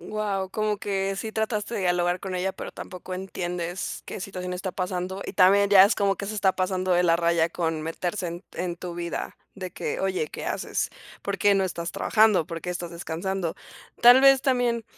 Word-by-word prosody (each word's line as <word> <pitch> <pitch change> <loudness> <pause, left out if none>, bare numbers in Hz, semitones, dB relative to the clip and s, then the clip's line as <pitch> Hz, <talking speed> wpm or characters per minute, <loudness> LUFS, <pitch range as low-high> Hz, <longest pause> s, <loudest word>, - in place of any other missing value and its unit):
Guau, 195 0 -2
como 215 0 -1
que 195 -1 -1
sí 220 +2 -5
trataste 220 0 -2
de 205 - -1
dialogar 175 0 +1
con 185 -2 -4
ella, 190 +1 -1
pero - - -7
tampoco 185 0 -8
entiendes 180 -1 -4
qué - - -6
situación 180 -1 -5
está 185 +1 -3
pasando. 185 +1 -3
Y - - -5
también 200 +2 +5
ya 195 -2 +9
es 205 - +2
como 200 -1 +2
que 200 - -6
se 215 +1 -4
está 190 -2 +2
pasando 185 0 0
de 175 0 +4
la 165 -1 +4
raya 170 -1 +2
con 165 -2 -2
meterse 175 +3 -3
en 170 +2 -7
en 175 -1 -3
tu 175 0 -6
vida, 170 0 -4 0.2
de 185 -3 -7
que: - - -3
"Oye, 185 -5 -1
¿qué - - -7
haces? - - -2 0.3
¿Por 200 0 -3
qué 200 +3 +4
no 190 - +2
estás 170 -2 -3
trabajando? 215 -7 +3
¿Por 165 -2 -6
qué 180 - -4
estás 175 -1 -5
descansando?". 170 +1 -3 0.4
Tal 245 +2 +9
vez 270 -1 +7
también 245 -3 +1
185 Hz, 205 wpm, -26 LUFS, 175-200 Hz, 0.4 s, ya